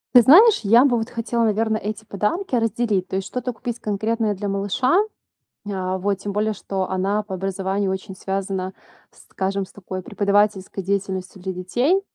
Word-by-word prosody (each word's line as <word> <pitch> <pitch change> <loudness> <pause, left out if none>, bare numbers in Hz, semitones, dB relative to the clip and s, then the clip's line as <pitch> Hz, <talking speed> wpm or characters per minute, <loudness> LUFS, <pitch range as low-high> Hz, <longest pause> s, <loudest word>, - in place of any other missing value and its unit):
Ты 245 - +11
знаешь, 390 - +7
я 230 +5 +6
бы 255 -4 +3
вот 225 0 -3
хотела, 235 0 -1
наверно, 220 0 +1
эти 215 +1 -5
подарки 215 - -2
разделить, 225 -4 +1
то - - -4
есть 190 0 -2
что-то 250 +3 -3
купить 240 0 -5
конкретное 215 +1 -1
для 205 +2 -4
малыша. 200 - +2 0.7
А, 185 -1 -2
вот. 200 +1 0
Тем 200 +1 -5
более, 210 +1 0
что 190 -2 -3
она 195 +3 0
по 205 -2 -7
образованию 195 +1 -1
очень 190 0 -5
связана, 190 -1 -3 0.4
скажем, 195 0 -3
с - - -20
такой 185 -1 -6
преподавательской 200 0 +1
деятельностью 190 -1 -3
для 190 0 -3
детей. 240 - +1
200 Hz, 170 wpm, -22 LUFS, 190-225 Hz, 0.7 s, Ты